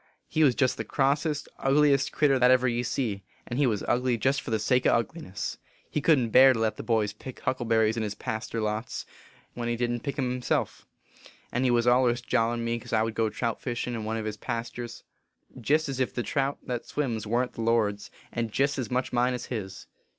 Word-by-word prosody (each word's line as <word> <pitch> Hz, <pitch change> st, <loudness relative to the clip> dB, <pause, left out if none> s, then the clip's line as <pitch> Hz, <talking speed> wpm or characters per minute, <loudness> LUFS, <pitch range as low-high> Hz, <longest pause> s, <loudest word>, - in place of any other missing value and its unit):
He 155 Hz, -, +2 dB
was 130 Hz, -5 st, +4 dB
jest 130 Hz, -4 st, +1 dB
the -, -, -2 dB
Grossest, 145 Hz, +2 st, 0 dB
ugliest 140 Hz, 0 st, +3 dB
critter 140 Hz, -3 st, +3 dB
that 125 Hz, 0 st, +5 dB
ever 130 Hz, 0 st, +4 dB
ye 120 Hz, 0 st, 0 dB
see, 115 Hz, -5 st, -2 dB, 0.2 s
and 120 Hz, -, -3 dB
he 145 Hz, -, +4 dB
was 105 Hz, -4 st, -1 dB
ugly 125 Hz, 0 st, +1 dB
jest 135 Hz, +4 st, +1 dB
for -, -, -7 dB
the 110 Hz, -, +1 dB
sake 125 Hz, +4 st, +2 dB
o -, -, +5 dB
ugliness. 115 Hz, -, -3 dB, 0.3 s
He 150 Hz, -, -1 dB
couldn 150 Hz, -4 st, +4 dB
t 115 Hz, -, -2 dB
bear 130 Hz, +2 st, +8 dB
to 115 Hz, -, -3 dB
let 110 Hz, -1 st, 0 dB
the -, -, -4 dB
boys 110 Hz, -3 st, 0 dB
pick 130 Hz, +4 st, -10 dB
huckleberries 115 Hz, -3 st, +1 dB
in -, -, 0 dB
his 105 Hz, -1 st, -3 dB
paster 110 Hz, +2 st, -4 dB
lots, 110 Hz, +2 st, -3 dB, 0.5 s
when 120 Hz, -1 st, -3 dB
he 120 Hz, -, 0 dB
didn 120 Hz, 0 st, -1 dB
t -, -, -25 dB
pick 140 Hz, 0 st, -4 dB
em 130 Hz, -3 st, 0 dB
himself; 125 Hz, 0 st, -2 dB, 0.6 s
and 125 Hz, +2 st, 0 dB
he -, -, +3 dB
was 120 Hz, -1 st, +3 dB
allers 120 Hz, -1 st, +4 dB
jawin 115 Hz, -1 st, +1 dB
me 115 Hz, 0 st, -1 dB
cause 115 Hz, -, -9 dB
I 110 Hz, 0 st, +3 dB
would 115 Hz, 0 st, -2 dB
go 110 Hz, 0 st, +1 dB
trout 115 Hz, +1 st, -3 dB
fishin 120 Hz, 0 st, -3 dB
in 115 Hz, -2 st, -4 dB
one 110 Hz, +1 st, -2 dB
o 110 Hz, -, -3 dB
his 110 Hz, -1 st, -4 dB
pasters. 120 Hz, 0 st, -5 dB, 0.6 s
Jest 155 Hz, +6 st, +2 dB
ez 135 Hz, -2 st, -4 dB
if 130 Hz, -, -1 dB
the 120 Hz, -, -1 dB
trout 135 Hz, +6 st, -1 dB
that 125 Hz, -2 st, -4 dB
swims 115 Hz, -8 st, -2 dB
warn 120 Hz, +3 st, +1 dB
t -, -, -31 dB
the -, -, -3 dB
Lord 115 Hz, -3 st, +2 dB
s, 105 Hz, +1 st, -12 dB, 0.2 s
and 115 Hz, -2 st, -2 dB
jest 140 Hz, +4 st, +1 dB
ez 120 Hz, -5 st, -3 dB
much 125 Hz, +1 st, -1 dB
mine 125 Hz, +1 st, +2 dB
as 125 Hz, -, -6 dB
his. 95 Hz, -4 st, -6 dB
120 Hz, 230 wpm, -27 LUFS, 115-130 Hz, 0.6 s, bear